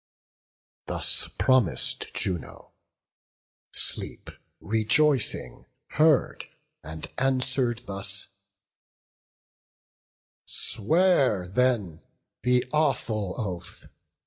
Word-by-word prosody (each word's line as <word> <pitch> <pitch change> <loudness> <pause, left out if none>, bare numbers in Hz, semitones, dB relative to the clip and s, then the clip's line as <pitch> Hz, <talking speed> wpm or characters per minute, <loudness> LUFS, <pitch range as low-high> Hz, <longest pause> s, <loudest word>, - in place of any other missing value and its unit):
Thus - - +2
promis'd 115 - +2
Juno; 90 -4 -4 1.0
Sleep, - - 0 0.3
rejoicing, 115 +5 0 0.2
heard, 155 -2 +2 0.4
And 80 +1 -7
answer'd 130 -2 0
thus: 100 0 -3 2.2
"Swear 135 - +2
then 105 -7 0 0.4
the 125 0 +2
awful 110 -10 0
oath. 90 -6 -5
115 Hz, 60 wpm, -26 LUFS, 95-135 Hz, 2.2 s, Thus